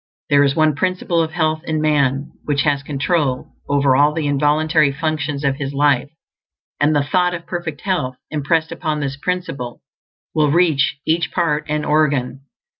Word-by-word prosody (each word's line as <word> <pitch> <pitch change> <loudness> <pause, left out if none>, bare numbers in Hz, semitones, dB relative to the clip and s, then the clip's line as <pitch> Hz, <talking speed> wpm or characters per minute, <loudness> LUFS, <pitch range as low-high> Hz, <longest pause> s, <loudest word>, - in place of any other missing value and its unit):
There 140 0 +6
is 140 0 +1
one 155 -1 +3
Principle 180 +1 0
of 160 - -1
Health 155 -1 0
in 160 -2 -2
man, 140 -3 +1
which 140 -2 +1
has 145 -2 +1
control 140 -1 -1 0.2
over 140 -2 +3
all 145 +2 +4
the 160 -2 -1
involuntary 150 +1 +2
functions 150 -1 -2
of 135 -1 +1
his 140 -1 -4
life; 140 -2 +2 0.7
and 150 +1 +3
the 145 - +2
thought 180 +4 +1
of 170 - -8
perfect 170 -5 -5
health, 155 -10 -1 0.2
impressed 160 +2 0
upon 155 -3 -2
this 140 -1 -3
Principle, 145 -6 -4 0.5
will 155 -2 +2
reach 155 -4 +2
each 160 -2 0
part 155 -4 0
and 150 0 -1
organ. 145 -4 +1
150 Hz, 165 wpm, -19 LUFS, 140-160 Hz, 0.7 s, There